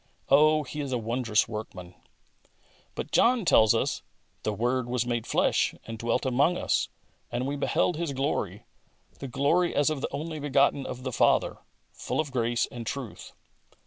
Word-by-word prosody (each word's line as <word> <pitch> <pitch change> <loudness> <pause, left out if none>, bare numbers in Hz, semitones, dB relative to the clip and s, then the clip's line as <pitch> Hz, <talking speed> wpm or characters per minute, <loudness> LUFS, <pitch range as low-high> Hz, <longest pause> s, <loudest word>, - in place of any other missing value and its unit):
Oh, 155 +2 +5
He 150 +2 -6
is 140 -2 -4
a 125 - +1
wondrous 115 -1 +1
workman! 100 -5 -7 1.0
But - - -5
John 240 -3 +3
tells 110 -9 +5
us - - -1 0.2
" - - -41
The 110 - -1
Word 120 +4 0
was 125 -1 0
made 120 -2 -2
flesh - - +2
and 115 -1 -7
dwelt 115 +2 0
among 140 +7 +2
us - - 0 0.4
(and 120 +2 -2
we 140 +2 -2
beheld 150 +3 +1
His 165 -3 -2
glory, 135 +2 -2 0.5
the 135 - -5
glory 155 +8 +1
as 145 +1 +3
of 145 -3 -3
the - - -2
only 155 +2 -4
begotten 140 -1 +2
of 125 0 -7
the 130 - -3
Father) - - +2 0.3
full - - -4
of 150 -3 -1
grace 120 -2 +1
and 120 -2 -7
truth." 130 -4 -6
130 Hz, 175 wpm, -27 LUFS, 120-145 Hz, 1.0 s, Oh